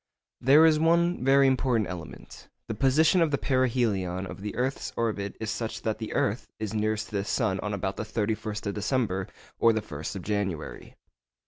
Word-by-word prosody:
There 145 +5 +6
is 155 -1 +4
one 170 0 +2
very 135 +1 +5
important 125 -5 +2
element. 85 -3 -9 0.2
The - - -3
position 150 - +3
of 165 - +3
the 140 - +1
perihelion 115 -9 0
of 95 - -9
the 105 0 -5
earth's 130 +2 -2
orbit 105 -4 -2
is 110 -1 -3
such 115 +1 -4
that 110 -1 -1
the 110 - -5
earth 105 +5 0
is 110 -1 -4
nearest 110 0 -1
to 105 - -3
the 100 - -1
sun 95 -1 0
on 105 - -3
about 95 -1 -3
the - - -2
31st 110 -1 -3
of 100 - -1
December 105 -4 -1 0.3
or 115 -1 +5
the 110 - 0
1st 75 +3 -6
of 95 - -6
January. 100 -6 -3
110 Hz, 190 wpm, -27 LUFS, 100-130 Hz, 0.3 s, There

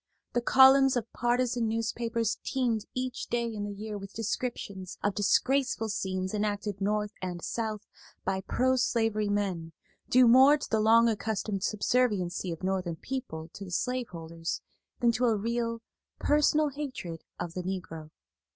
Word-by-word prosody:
The 240 - +1
columns 265 +1 +6
of 235 -1 -4
partisan 240 -1 +1
newspapers 230 0 -1
teemed 235 -5 0
each 255 0 -3
day 235 0 0
in 205 -1 -3
the 205 - -4
year 210 +1 -6
with 195 0 -10
descriptions 205 -4 -4
of 205 - +1
disgraceful 245 +3 +1
scenes 185 -1 -2
enacted 205 -1 -2
North 210 +1 0
and 180 -2 -4
South 220 -2 -3 0.4
by 190 0 0
pro 260 +6 +1
slavery 225 -4 +1
men, 185 -5 -1 0.4
due 255 -1 +6
more 265 +5 +7
to 290 - -6
the 220 - +1
long 225 +2 +6
accustomed 215 -2 -2
subserviency 205 -5 0
of 165 +2 -7
Northern 185 -3 -1
people 165 -7 -5
to 200 - -8
the 190 - -8
slaveholders 170 -7 -3 0.4
than 240 -1 +5
to 245 +2 0
a 225 -3 +3
real, 230 +1 -2 0.3
personal 300 +1 +3
hatred 260 - -6 0.2
of 170 -1 -4
the 180 - -3
Negro. 175 -4 -5
220 Hz, 150 wpm, -29 LUFS, 190-245 Hz, 0.4 s, more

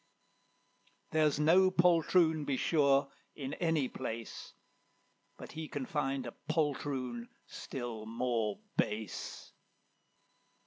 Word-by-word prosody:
There's 155 -2 +3
no 180 +5 +6
poltroon, 170 -2 +4
be 140 -2 -1
sure, 140 -3 +3 0.2
in 140 -1 -5
any 160 -6 +1
place, 115 -3 -6 0.8
But - - -9
he 160 0 -5
can 145 -3 -4
find 135 -2 -1
a - - -6 0.2
poltroon 135 -6 -1 0.2
still 120 -4 -6
more 115 -2 -1 0.2
base. 105 -3 -2
140 Hz, 95 wpm, -33 LUFS, 120-155 Hz, 0.8 s, no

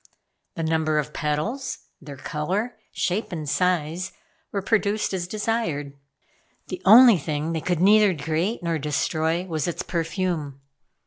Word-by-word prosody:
The 165 - -3
number 160 -1 +1
of 150 0 -2
petals, 180 - -2 0.2
their 145 -2 -9
color, 185 - -2 0.2
shape 195 +5 -1
and 155 -4 -5
size, 180 +2 0 0.4
were 200 -2 -2
produced 210 -1 +1
as 175 -2 -2
desired. 210 -9 -2 0.8
The 185 -1 -5
only 225 -1 +9
thing 155 +2 -2
they 160 - -2
could 175 -1 -1
neither 205 -1 +5
create 165 +8 -1
nor 165 -2 -1
destroy 160 +3 0
was 160 -4 -2
its 175 - -3
perfume. 165 -4 -2
170 Hz, 135 wpm, -24 LUFS, 155-195 Hz, 0.8 s, only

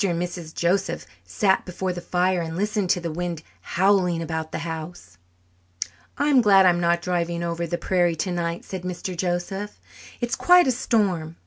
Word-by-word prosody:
and 170 -1 -1
Mrs. 175 -2 -5
Joseph 185 +3 0 0.2
sat 190 - +2
before 185 0 -3
the 175 - -6
fire 180 0 +1
and 165 0 -4
listened 205 -1 0
to 180 - +3
the 170 -1 -4
wind 170 -1 -4 0.2
howling 185 -2 +2
about 160 -1 -4
the - - -3
house. 160 - -7 1.0
"I'm 285 -3 +4
glad 195 -3 +6
I'm 175 -1 +4
not 170 0 +2
driving 170 -1 -1
over 170 0 -2
the 175 - -2
prairie 175 -1 +1
tonight," 170 -1 -2
said 190 -2 -5
Mr. 180 0 -5
Joseph. 185 +3 -3 0.4
"It's 240 -1 -2
quite 360 0 +6
a 260 - +3
storm. 190 -10 0
175 Hz, 165 wpm, -24 LUFS, 170-190 Hz, 1.0 s, glad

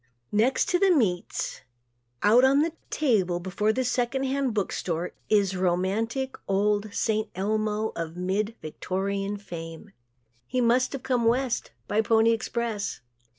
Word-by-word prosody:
Next 225 +6 +2
to 355 - +2
the 390 - +4
meats, 210 - 0 0.6
out 230 +5 +6
on 275 +3 +5
a 335 - -2 0.2
table 195 - +1
before 190 +4 -1
a 255 +4 +1
second 250 +2 0
hand 270 -1 0
book 200 -3 0
store 170 0 -2 0.2
is 200 -3 +3
romantic, 195 +9 0
old 205 +1 +1
"St. 215 0 0
Elmo" 215 +2 0
of 165 0 -5
mid 200 +5 -1
Victorian 195 +5 -3
fame. 170 0 -8 0.6
He 255 - -1
must 250 +2 +3
have 275 - -5
come 250 -3 +1
West 245 +1 +1 0.2
by 215 - +2
the 220 - -9
"Pony 225 0 +5
Express." 225 -2 -2
215 Hz, 145 wpm, -26 LUFS, 195-245 Hz, 0.6 s, out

